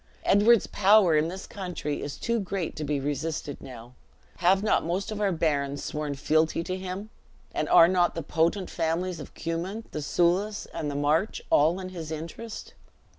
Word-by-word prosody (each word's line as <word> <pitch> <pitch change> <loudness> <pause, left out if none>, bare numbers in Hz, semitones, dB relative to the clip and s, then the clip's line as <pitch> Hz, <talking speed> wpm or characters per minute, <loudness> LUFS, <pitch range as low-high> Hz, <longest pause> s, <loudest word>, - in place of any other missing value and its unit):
Edward's 215 +3 +5
power 200 -4 +5
in 155 +1 +3
this 190 +3 -6
country 180 -6 -4
is 145 -1 -5
too 235 0 -1
great 195 -3 -3
to 155 - -4
be 145 -1 -1
resisted 145 +1 -3
now. 120 -1 -11 0.4
Have 190 +3 +3
not 215 - +2
most 185 +6 -2
of 210 -1 -4
our 200 -2 +2
barons 145 -4 -1
sworn 150 -1 -3
fealty 155 +4 +1
to 185 - -3
him? 190 +3 -6 0.4
and - - -1
are 165 - +8
not 175 -1 +2
the 165 - -3
potent 170 +5 0
families 170 +1 -1
of - - -9
the - - -19
Cummin, 175 +7 -3
the 155 - -4
Soulis, 185 +7 +1
and 150 - -3
the 145 - -4
March, 150 +8 +1
all 160 +5 +4
in 185 -1 -6
his 170 -4 -7
interest? 170 +8 -7
170 Hz, 180 wpm, -27 LUFS, 150-190 Hz, 0.4 s, are